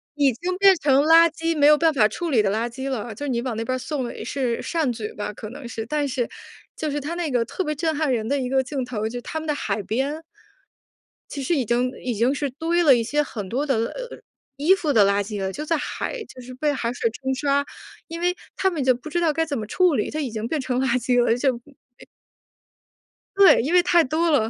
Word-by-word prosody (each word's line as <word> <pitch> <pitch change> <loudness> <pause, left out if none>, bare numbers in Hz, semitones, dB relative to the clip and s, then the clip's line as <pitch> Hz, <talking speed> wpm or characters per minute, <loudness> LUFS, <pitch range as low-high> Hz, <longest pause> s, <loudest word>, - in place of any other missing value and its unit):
已 285 -3 +3
经 360 +10 -3
变 390 0 +6
成 280 -2 +3
垃 330 +2 +7
圾 330 +1 -2
没 290 -1 +5
有 300 0 +7
办 320 0 +3
法 220 -7 +4
处 330 - -4
理 230 - +4
的 200 -2 +1
垃 225 +3 -1
圾 265 +3 -5
了， 240 -3 -4
就 290 - -5
是 - - -3
你 235 -2 0
往 250 -3 -3
那 225 - -2
边 255 - -1
儿 - - -4
送， 275 -1 -3
呃， - - -7
是 250 -4 -1
善 320 -6 -1
举 220 -3 -6
吧 205 0 -4
可 215 +1 -8
能 265 -1 -9
是， 225 -1 -5
但 295 +4 -1
是 250 -3 -1 0.5
就 310 - -3
是 295 - -2
它 300 +5 -4
那 345 -3 -2
个 240 -2 +1
特 375 - -3
别 305 -3 -2
震 320 +1 -1
撼 300 -2 0
人 220 -2 -1
的 280 +3 0
一 250 -1 -2
个 265 0 +2
镜 265 0 -3
头， 220 -4 -3
就 245 +1 -6
他 315 - -5
们 315 - -7
的 300 - +1
海 205 -6 -2
边， 275 +9 -2 1.1
其 280 - -5
实 335 +6 +1
已 270 - +1
经 245 +3 +1
已 245 -2 -2
经 235 +5 +2
是 285 0 -2
堆 325 +6 0
了 280 -5 +7
一 235 - 0
些 290 +6 0
很 210 -8 -6
多 265 +7 -1
的， 275 -3 +1
呃， 480 - -4 0.4
衣 315 +7 +4
服 310 -6 -1
的 215 - +6
垃 200 +1 +2
圾 205 0 -5
了， 190 0 -2
就 300 +10 -6
在 330 - +1
海 445 +10 -4
就 - - -14
是 255 +1 -10
被 295 +4 0
海 240 -3 -2
水 230 - 0
冲 265 +3 -3
刷， 280 +1 +1 0.4
因 335 +1 -6
为 355 +1 +1 0.2
他 385 - +2
们 325 -7 -3
就 255 0 +4
不 250 +6 -9
知 345 - -1
道 325 -3 +2
该 325 +2 +1
怎 290 -3 -3
么 215 - -4
处 360 - +2
理 210 - -1
就 310 - -3
已 280 -4 -2
经 220 0 -4
变 305 +2 -2
成 255 -1 -1
垃 265 - +1
圾 245 +1 +1
了， 230 - +3
就， 260 -1 +1
嗯 255 0 -20 1.3
对， 395 -1 +7
因 285 +8 -2
为 360 - +7
太 345 -1 +4
多 320 +5 0
了。 225 -7 +2
270 Hz, 280 characters per minute, -23 LUFS, 240-310 Hz, 1.3 s, 垃